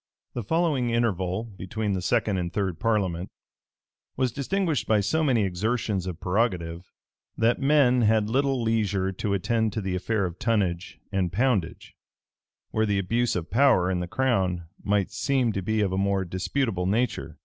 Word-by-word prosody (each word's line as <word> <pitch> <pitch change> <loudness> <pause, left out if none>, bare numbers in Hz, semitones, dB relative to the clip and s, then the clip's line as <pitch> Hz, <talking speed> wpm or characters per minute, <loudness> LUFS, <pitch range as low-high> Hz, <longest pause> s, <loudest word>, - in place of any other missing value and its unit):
The 120 - -3
following 145 - +1
interval 105 -4 0
between 105 0 -4
the 95 - -2
second 105 0 +1
and 85 -1 -3
third 95 -4 -2
parliament, 100 -6 0 0.9
was 130 -1 +1
distinguished 160 - -1
by 110 -1 +3
so 160 +11 +1
many 125 -7 +2
exertions 100 0 -1
of 85 -3 -5
prerogative, 90 -4 -1 0.5
that 115 +4 +2
men 135 -3 +4
had 110 -1 +3
little 135 +3 +1
leisure 105 -4 0
to 100 +2 -2
attend 110 +2 0
to 110 - -2
the 95 -2 -3
affair 100 +2 0
of 90 0 -6
tonnage 95 -6 -1
and 95 -4 0
poundage, 100 -5 -1 0.8
where 110 0 +1
the 100 -1 +1
abuse 115 +6 0
of 85 -2 -4
power 115 -7 +4
in 90 - 0
the 90 - -3
crown 95 -7 0 0.2
might 100 -1 +1
seem 125 +3 +1
to 100 - -2
be 110 +3 0
of 100 -3 +1
a 95 - -1
more 100 -1 +1
disputable 95 +2 -1
nature. 100 -7 -1
105 Hz, 165 wpm, -26 LUFS, 95-120 Hz, 0.9 s, men